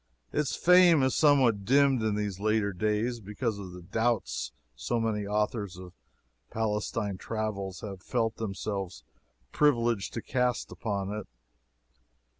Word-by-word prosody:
Its 150 -3 0
fame 180 -4 +6
is 130 - +2
somewhat 130 -9 +4
dimmed 135 +2 +4
in 110 -1 0
these 105 -3 -3
latter 105 -1 +1
days, 110 +5 0
because 105 +1 -3
of 95 -2 -7
the 90 0 -10
doubts 100 - -1 0.2
so - - -1
many 105 -3 -1
authors 105 -2 -1
of 90 -1 -10 0.6
Palestine 105 -2 -2
travels 105 -4 -4
have 100 -3 -7
felt 115 0 -1
themselves 100 -3 -4 0.5
privileged 120 -8 +2
to 115 - -2
cast 125 -2 0
upon 100 -3 -3
it. 105 0 -5
110 Hz, 130 wpm, -29 LUFS, 100-120 Hz, 0.6 s, fame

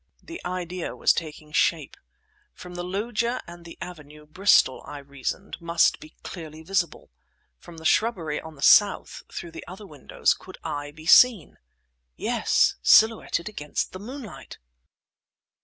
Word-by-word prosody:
The 335 - -9
idea 180 -1 -4
was - - +3
taking 155 -2 -6
shape. - - +1 0.6
From 180 0 -11
the 175 0 -5
loggia 230 +6 -2
and 170 0 -12
the 165 - -11
avenue 150 -3 -10
Bristol, 155 -4 +3
I 145 - -7
reasoned, 140 +7 -6
must 170 0 +2
be 155 - -14
clearly 160 -3 -9
visible. 180 - -2 0.5
From 170 - -13
the 160 - -11
shrubbery 170 -8 +1
on 160 -1 -11
the 140 - -9
south, 205 +3 +4
through 170 - -7
the - - -9
other 190 +4 -10
windows 150 -7 -1
could 185 - -13
I 145 -2 -4
be 155 +2 -14
seen? 220 -2 +5 0.6
Yes, - - +1
silhouetted 220 -5 +4
against 150 -9 -4
the 185 - -8
moonlight! 235 - -9
170 Hz, 140 wpm, -25 LUFS, 155-195 Hz, 0.6 s, seen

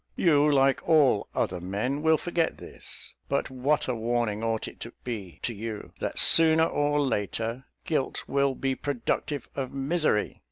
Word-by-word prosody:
You, 150 -3 +3
like 135 -1 +3
all 145 -10 +4
other 90 -1 -1
men, 105 +10 -2
will 160 0 +4
forget 170 -1 -1
this; - - -7 0.2
but - - -1
what 135 +4 0
a 130 - 0
warning 115 -2 -1
ought 115 -1 -1
it - - -11
to 115 - -8
be 105 -8 -6
to 120 - -2
you, 110 0 -7
that, - - -4
sooner 160 0 +7
or 145 -1 0
later, 115 -1 -2 0.2
guilt 150 -5 -1
will 140 -1 +1
be 135 0 -1
productive 140 +1 -3
of 135 -1 -4
misery! 140 -5 0
135 Hz, 160 wpm, -27 LUFS, 115-145 Hz, 0.2 s, sooner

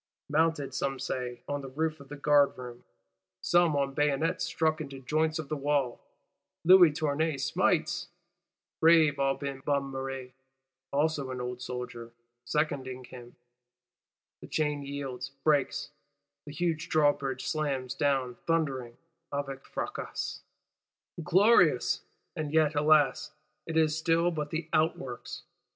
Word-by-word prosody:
Mounted, 150 -3 +1
some 135 +1 -1
say 125 -2 -4
on 145 0 -2
the 135 - -8
roof 155 +3 -2
of 140 - -14
the 145 - -6
guard 145 0 +3
room, 125 -1 -9 0.6
some 175 -3 +3
"on 140 -1 0
bayonets 150 +5 +1
stuck 155 -1 0
into 140 -3 -7
joints 155 +4 0
of 155 -3 -5
the 155 - -2
wall," 140 -3 0 0.6
Louis 180 -2 +8
Tournay 150 0 0
smites, 170 +3 0 0.7
brave 160 -3 +5
Aubin 135 0 -1
Bonnemere 135 -2 -3 0.6
(also 145 -1 0
an 130 -1 -4
old 125 0 -5
soldier) 125 -2 -6 0.3
seconding 130 -2 -2
him: 120 -1 -12 1.1
the - - -10
chain 150 -2 -1
yields, 140 -2 -5
breaks; 145 -3 +1 0.6
the - - -6
huge 165 +1 -2
Drawbridge 140 -4 +1
slams 135 -3 -1
down, 135 -3 0
thundering 135 -8 -1 0.3
(avec 135 -1 -4
fracas). - - -4 0.8
Glorious: 190 +8 +4 0.3
and 155 -3 -3
yet, 155 -1 +3
alas, 150 0 +3 0.4
it 165 -1 -2
is 155 -1 +3
still 165 +2 +2
but 150 -3 -3
the 160 0 -3
outworks. 155 -6 -1
145 Hz, 125 wpm, -29 LUFS, 135-155 Hz, 1.1 s, Louis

